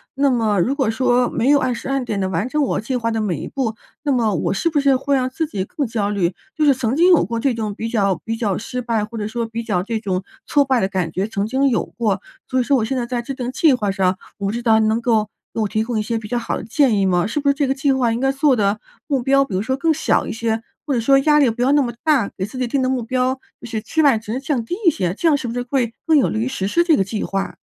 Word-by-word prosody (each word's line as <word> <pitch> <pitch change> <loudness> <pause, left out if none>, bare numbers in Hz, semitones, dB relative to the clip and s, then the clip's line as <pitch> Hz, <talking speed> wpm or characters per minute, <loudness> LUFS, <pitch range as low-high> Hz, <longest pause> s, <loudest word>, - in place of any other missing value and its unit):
那 275 0 +3
么 220 -5 +1
如 235 +10 +2
果 270 -5 0
说 245 +1 +2
没 245 +3 0
有 290 0 +6
按 255 -2 0
时 235 - -7
按 270 -1 0
点 210 -4 -3
地 190 - 0
完 190 +7 -1
成 300 +2 +1
我 270 - 0
计 255 +4 -3
划 230 -1 -1
的 225 -1 -1
每 200 -5 -1
一 - - -6
步， 240 -5 -2 0.3
那 295 -1 0
么 230 -5 +2
我 175 - -1
是 200 - -1
不 300 - +2
是 275 -1 +4
会 275 +2 0
让 255 -1 0
自 295 +5 -2
己 200 -11 -3
更 285 +7 -3
焦 220 -4 -1
虑。 190 -4 0 0.2
就 305 - +2
是 285 - +6
曾 250 -1 -1
经 345 +4 +5
有 350 - +5
过 230 +6 -3
这 265 +2 +1
种 215 -3 -3
比 225 - -4
较 200 -6 +1
比 225 - -2
较 215 -5 -1
失 250 +3 -4
败， 230 -3 -1
或 225 +1 -8
者 210 - -2
说 230 +1 -3
比 230 +1 -5
较 180 -6 -1
这 225 +2 -2
种 190 -3 -2 0.2
挫 285 -1 +3
败 260 -2 +2
的 190 - +2
感 185 -4 -2
觉 190 +5 -1
曾 205 -2 -2
经 265 +5 +1
有 235 - 0
过， 205 -4 -2 0.3
所 260 - +1
以 - - +2
说 280 +3 +2
我 235 - 0
现 260 +4 -2
在 245 - -1
在 240 0 -2
制 270 +3 -6
定 250 -1 -4
计 310 +3 +4
划 210 -5 -1
上， 190 -1 +1 0.2
我 200 - -3
不 - - 0
知 235 +2 -4
道 220 -2 +4
你 220 - +2
能 220 +1 +1
给 235 - 0
我 215 -2 +2 0.3
给 - - -3
我 215 - +1
提 215 - 0
供 235 -1 -2
一 - - +1
些 230 +2 -2
比 220 -1 -6
较 245 - 0
好 230 - -3
的 - - -7
建 245 -1 +2
议 195 - +2
吗？ 180 -2 +2
是 260 - -2
不 280 - +2
是 - - +4
这 285 0 0
个 265 - +1
计 275 +1 +1
划 255 -3 +2
应 230 - -2
该 270 - +2
做 275 0 +3
的 205 0 +1 0.3
目 275 -5 0
标 275 +2 +4
比 225 - -8
如 185 - 0
说 260 +5 -1
更 320 +3 +2
小 315 - +1
一 - - -3
些， 225 0 -1 0.2
或 290 - -1
者 245 - +1
说 275 +4 +5
压 300 +2 +4
力 275 -4 +4
不 230 +2 -4
要 255 +2 +3
那 290 - +5
么 245 -3 -1
大， 280 -10 +3
给 190 - -1
自 220 +5 -9
己 255 -1 -1
定 270 +3 0
的 255 - +1
目 260 -2 -1
标 255 +2 0 0.3
就 240 - -8
是 225 -2 -3
期 315 +9 0
望 280 -6 +5
值 225 +3 -4
降 270 -3 -1
低 350 - -3
一 - - +8
些， 180 - -2
这 330 - 0
样 300 - +4
是 275 - -4
不 - - -4
是 245 - -2
会 245 -2 -1
更 320 - +5
有 275 - +3
利 220 - -2
于 225 - 0
实 230 -8 -2
施 340 +10 +3
这 330 -3 +5
个 195 - +2
计 205 +2 -4
划？ 195 0 -3
235 Hz, 345 characters per minute, -20 LUFS, 215-270 Hz, 0.3 s, 一